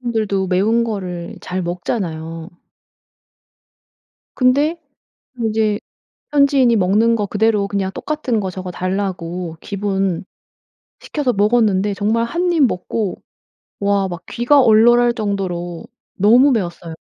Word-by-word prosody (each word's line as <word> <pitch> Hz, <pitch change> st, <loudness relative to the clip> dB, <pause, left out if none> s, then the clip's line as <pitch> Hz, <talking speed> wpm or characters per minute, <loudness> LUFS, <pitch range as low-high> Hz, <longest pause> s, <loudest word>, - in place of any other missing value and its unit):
한국 240 Hz, -2 st, -2 dB
사람들도 200 Hz, -3 st, 0 dB
매운 215 Hz, +6 st, +2 dB
거를 180 Hz, -6 st, -5 dB
잘 185 Hz, +1 st, -4 dB
먹잖아요. 165 Hz, -2 st, -4 dB, 1.9 s
근데 280 Hz, +6 st, +2 dB, 0.6 s
인제 220 Hz, -2 st, 0 dB, 0.5 s
현지인이 280 Hz, -4 st, +4 dB
먹는 215 Hz, +4 st, +3 dB
거 210 Hz, -2 st, -1 dB
그대로 210 Hz, 0 st, +1 dB
그냥 200 Hz, -1 st, -2 dB
"똑같은 280 Hz, -7 st, -2 dB
거 190 Hz, -2 st, -3 dB
저거 185 Hz, 0 st, -6 dB
달라."고 180 Hz, -2 st, -3 dB
기본 195 Hz, -3 st, -2 dB, 0.8 s
시켜서 285 Hz, -5 st, -1 dB
먹었는데 205 Hz, -2 st, +2 dB
정말 220 Hz, +3 st, 0 dB
1 350 Hz, +9 st, -1 dB
입 330 Hz, -, +1 dB
먹고 205 Hz, 0 st, -3 dB, 0.6 s
와 200 Hz, -1 st, +1 dB
막 175 Hz, -1 st, -7 dB
귀가 270 Hz, +4 st, +3 dB
얼얼할 240 Hz, +1 st, +5 dB
정도로 185 Hz, -6 st, -3 dB, 0.3 s
너무 240 Hz, +8 st, +5 dB
매웠어요. 175 Hz, -7 st, -3 dB
205 Hz, 245 characters per minute, -18 LUFS, 185-235 Hz, 1.9 s, 얼얼할